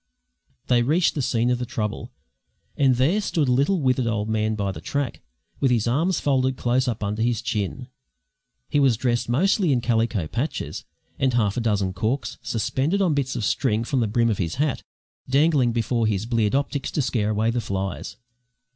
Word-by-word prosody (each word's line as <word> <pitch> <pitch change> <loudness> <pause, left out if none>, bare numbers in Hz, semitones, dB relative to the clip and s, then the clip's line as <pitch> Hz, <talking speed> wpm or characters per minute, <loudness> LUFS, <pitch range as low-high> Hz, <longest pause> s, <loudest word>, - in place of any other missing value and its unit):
They 120 -1 +3
reached 155 +8 +2
the 145 - -2
scene 120 -1 +1
of 125 - 0
the 125 - -2
trouble, 110 -5 -4 0.6
and 135 -3 +3
there 155 - +2
stood 160 -7 0
a - - +2
little 140 +9 +2
withered 130 -3 +1
old 110 -2 -1
man 110 0 0
by 100 -2 -1
the - - -8
track, 140 -3 -3 0.4
with 135 - +2
his 120 -2 +1
arms 160 +9 +1
folded 130 -2 +1
close 125 +2 +1
up 115 -3 -2
under 105 +2 -2
his 120 -1 +1
chin; 120 +1 -3 0.8
he 145 - +1
was 130 -5 +3
dressed 120 -1 0
mostly 180 - +2
in 130 - +3
calico 115 -5 0
patches; 130 - -4 0.3
and 130 -2 +1
half 105 -4 +1
a 125 - -1
dozen 100 -4 0
corks, 115 +9 -2
suspended 135 - -1
on 185 -5 +2
bits 135 -2 -1
of 110 - -2
string 115 -1 +1
from 130 +3 -1
the 115 - +1
brim 115 +2 +2
of 105 - -2
his 85 -3 -2
hat, 145 +1 0 0.5
dangled 140 -2 +3
before 115 0 0
his 105 -1 -1
bleared 115 -1 +1
optics 140 0 -1
to 150 - -1
scare 110 -5 0
away 110 +2 +1
the 120 +1 -1
flies. 95 -2 -4
120 Hz, 190 wpm, -24 LUFS, 110-135 Hz, 0.8 s, They